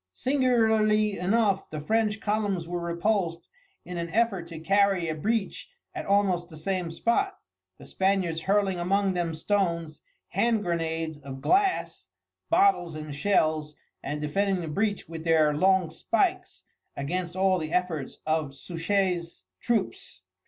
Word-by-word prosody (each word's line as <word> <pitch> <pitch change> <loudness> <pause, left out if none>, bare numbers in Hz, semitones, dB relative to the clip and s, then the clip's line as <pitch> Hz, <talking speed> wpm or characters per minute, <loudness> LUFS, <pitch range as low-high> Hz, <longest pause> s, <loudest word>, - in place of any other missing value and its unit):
Singularly 220 -6 +2
enough 195 +1 +1
the 155 - -5
French 215 +6 0
columns 205 -5 -1
were 175 0 -3
repulsed 170 0 -1 0.4
in 180 -1 -5
an 170 0 -3
effort 195 -3 0
to 170 -1 -8
carry 195 0 +2
a 160 - -1
breach 210 +6 -2 0.2
at - - -6
almost 190 -4 +2
the 160 - -11
same 180 +2 -2
spot, 300 - 0 0.4
the - - -13
Spaniards 190 -4 0
hurling 195 0 +1
among 195 +2 +1
them 170 -2 -2
stones, 170 -3 -1 0.3
hand 230 -3 +1
grenades 165 -3 -2
of 135 -1 -8
glass 385 - +1 0.4
bottles 335 - +3
and 155 -1 -6
shells, 155 -2 +1 0.3
and 150 +2 -4
defending 190 +5 0
the 165 - -5
breach 200 +6 -1
with 160 -1 -7
their 160 -2 +4
long 185 0 +3 0.2
pikes 370 +1 +1 0.3
against 175 +5 -3
all 190 -1 +2
the 155 -1 -5
efforts 170 -6 -1
of 155 -3 -1
Suchet's 175 +1 -2
troops. 240 - -2
180 Hz, 140 wpm, -27 LUFS, 165-205 Hz, 0.4 s, their